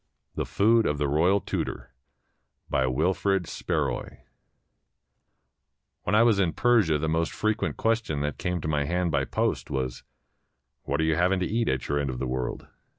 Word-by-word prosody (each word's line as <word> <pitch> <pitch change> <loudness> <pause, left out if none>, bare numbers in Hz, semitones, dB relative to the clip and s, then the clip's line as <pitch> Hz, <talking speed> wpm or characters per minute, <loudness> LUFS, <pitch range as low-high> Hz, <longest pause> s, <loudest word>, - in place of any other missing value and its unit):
THE - - -3
FOOD 115 +3 +3
OF 75 - 0
THE 75 0 0
ROYAL 85 +8 +3
TUTOR - - -4 0.8
BY 65 -1 +2
WILFRID 90 +7 +1
SPARROY - - -3 1.8
When 105 - +1
I 110 - +6
was 115 -4 +4
in 85 -5 +2
Persia 110 -11 +3
the 80 +2 -2
most 80 +1 0
frequent 110 0 -1
question 115 -10 0
that 75 0 -3
came 90 -2 -2
to - - -4
my 75 -2 0
hand 90 +2 0
by 70 -2 +1
post - - -1
was: 65 -2 -3 0.4
" 65 +2 -51
What 70 +2 -1
are - - +2
you 80 -1 +1
having 90 +2 +2
to - - +1
eat 115 +2 0
at 65 -1 -1
your 70 0 0
end 70 -1 -1
of 65 - -4
the 65 - -2
world?" 65 -1 -3
80 Hz, 180 wpm, -26 LUFS, 70-100 Hz, 1.8 s, I